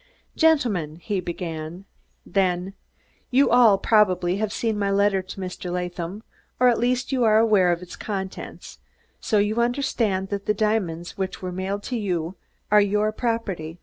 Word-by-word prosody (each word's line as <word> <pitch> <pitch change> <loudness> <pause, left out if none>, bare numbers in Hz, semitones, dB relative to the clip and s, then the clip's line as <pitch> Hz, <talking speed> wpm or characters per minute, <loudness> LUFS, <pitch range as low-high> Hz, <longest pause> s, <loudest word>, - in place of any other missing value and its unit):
"Gentlemen," 235 - +2
he 195 +4 -3
began, 170 0 -6 0.4
then, 185 -1 0 0.6
"you 265 +1 +3
all, 235 -5 +6
probably, 190 -4 +2
have 215 0 -1
seen 220 -2 -1
my 200 -1 0
letter 200 -1 +2
to 190 +1 -10
Mr. 180 -1 -5
Latham, 180 +3 -4 0.4
or 250 0 +6
at 240 - +2
least 250 +3 0
you 260 -2 +1
are 215 -1 +5
aware 210 -5 +4
of 175 +1 -2
its 180 - -10
contents, 190 -3 -6 0.4
so 215 - 0
you 210 +3 +2
understand 230 -6 0
that 200 -1 -4
the 210 - +2
diamonds 195 -6 -1
which 190 0 -3
were 180 - -3
mailed 190 +3 -3
to 250 - -3
you 175 -4 -2 0.4
are 210 0 +7
your 210 +1 +1
property. 205 -9 -3
200 Hz, 160 wpm, -24 LUFS, 180-220 Hz, 0.6 s, are